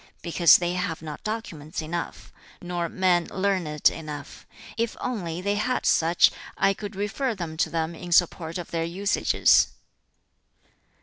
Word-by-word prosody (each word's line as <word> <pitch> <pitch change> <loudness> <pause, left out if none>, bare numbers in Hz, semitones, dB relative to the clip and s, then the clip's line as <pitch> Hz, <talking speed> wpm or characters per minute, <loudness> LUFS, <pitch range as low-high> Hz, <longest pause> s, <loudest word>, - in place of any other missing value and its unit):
Because 170 -1 +6
they 175 0 -1
have 180 -3 -3
not 155 -2 -7
documents 205 -9 -5
enough, 165 +2 -5 0.3
nor 175 -1 -3
men 180 -2 +2
learned 185 -6 +1
enough. 150 -3 -8 0.3
If 230 0 -2
only 180 -9 -3
they 200 +2 0
had 250 +4 -1
such, 165 +2 +4 0.3
I 195 0 +3
could 205 0 -8
refer 220 +5 -2
them 170 -4 -5
to - - +1
them 165 0 -2
in 175 +1 -9
support 170 -1 +2
of 175 - -7
their 165 -1 -1
usages. 190 +5 +3
175 Hz, 140 wpm, -25 LUFS, 165-200 Hz, 0.3 s, Because